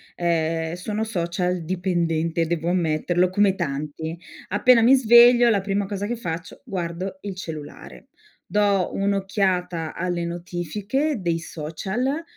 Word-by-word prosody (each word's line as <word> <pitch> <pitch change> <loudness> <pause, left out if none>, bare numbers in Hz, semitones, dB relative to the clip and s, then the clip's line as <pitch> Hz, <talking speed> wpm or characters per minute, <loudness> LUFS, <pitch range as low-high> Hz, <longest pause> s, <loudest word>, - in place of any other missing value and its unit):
ehm, 165 -1 0
sono 210 +5 -3
social-dipendente. 175 -3 -1
Devo 170 0 -1
ammetterlo, 175 +1 +1
come 195 +1 +3
tanti. 155 +2 -4 0.3
Appena 230 +4 +5
mi 255 +4 +7
sveglio 240 0 +7
la 205 -3 +2
prima 200 +1 -1
cosa 200 0 -4
che 240 - -2
faccio 170 -6 -6
guardo 185 +1 -4
il 200 -2 -6
cellulare. 155 -5 -9 0.4
Do 200 -3 +2
un'occhiata 190 -4 -1
alle 175 -1 -2
notifiche 190 - -2
dei 170 -2 0
social, 190 - -3
180 Hz, 115 wpm, -23 LUFS, 170-205 Hz, 0.4 s, mi